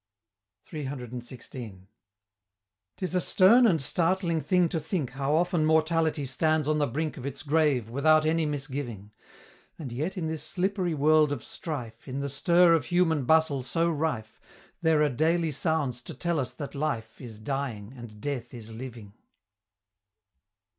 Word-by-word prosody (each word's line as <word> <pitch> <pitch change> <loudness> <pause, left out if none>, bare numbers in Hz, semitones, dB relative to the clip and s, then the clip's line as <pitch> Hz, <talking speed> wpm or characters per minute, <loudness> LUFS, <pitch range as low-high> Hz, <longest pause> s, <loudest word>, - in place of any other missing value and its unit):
CCCXVI. 125 - -7 1.1
'Tis 185 -1 -3
a 180 - +2
stern 230 +8 +6
and 170 -7 +3
startling 170 +3 +1
thing 180 0 +3
to 165 - -2
think 155 -4 -3
How 135 +3 0
often 175 -1 +2
mortality 160 -1 +2
stands 155 +3 +1
on 155 0 +2
the 145 - +2
brink 155 +6 -3
Of 130 - -7
its 140 - -6
grave 145 -6 +2
without 155 +6 +3
any 160 0 +2
misgiving: 135 -8 -5 0.7
And 145 -7 -7
yet 155 +11 -3
in 170 - -2
this 160 -1 -3
slippery 185 -2 -1
world 150 +1 +4
of 140 -6 -3
strife, 130 -9 -6
In 130 +1 -4
the 140 0 -2
stir 170 +5 +4
of 160 -5 +2
human 165 -6 +2
bustle 160 -1 +3
so 165 +7 0
rife, 145 -9 -3 0.4
There 160 -2 +3
are 150 - +3
daily 160 +5 +1
sounds 145 -5 -1
to - - -8
tell 170 -2 -1
us 130 - -3
that 145 -3 -6
Life 140 -7 -3
Is 115 -4 -9
dying, 120 -2 -4
and 115 -4 -11
Death 125 -2 -4
is 115 -1 -9
living! 115 -3 -9
150 Hz, 155 wpm, -28 LUFS, 125-160 Hz, 1.1 s, stern